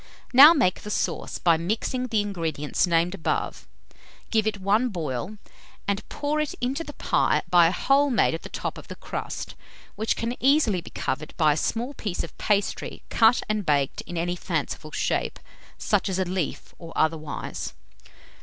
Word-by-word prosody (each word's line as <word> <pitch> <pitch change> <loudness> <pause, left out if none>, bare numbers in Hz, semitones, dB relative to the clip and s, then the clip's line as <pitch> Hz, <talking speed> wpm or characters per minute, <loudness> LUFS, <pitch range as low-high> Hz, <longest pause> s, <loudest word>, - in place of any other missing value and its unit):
Now 280 +5 +11
make 250 - +1
the 210 - -7
sauce, - - -2
by 170 -2 +3
mixing 225 +8 -2
the 220 -3 +1
ingredients 165 -6 -1
named 170 +1 +2
above; 180 -5 -2 0.6
give 220 -1 +2
it 205 -2 -1
one 210 +6 +2
boil, 165 - -4 0.5
and 200 +1 -2
pour 300 +1 -1
it 305 -1 -2
into 265 +6 -1
the 295 - -9
pie - - +1
by 175 -2 +7
a - - +1
hole 275 +8 +3
made 240 - +3
at 165 - -4
the - - -9
top - - -4
of - - -13
the - - -7
crust, - - -5 0.4
which 220 +1 0
can 230 +2 -2
easily 265 - +3
be - - -11
covered 145 +4 -4
by 155 -3 +4
a - - -3
small 235 - -2
piece 205 -9 -3
of 165 - -9
pastry 205 -2 -1
cut 230 +1 +4
and 215 -1 -1
baked 145 -5 +1
in 175 - -5
any 175 +1 -1
fanciful - - -3
shape - - -1 0.4
such - - +1
as 190 - -1
a 190 - +1
leaf, 180 -3 -3
or 165 -1 -10
otherwise. 155 -1 -2
200 Hz, 175 wpm, -25 LUFS, 165-235 Hz, 0.6 s, Now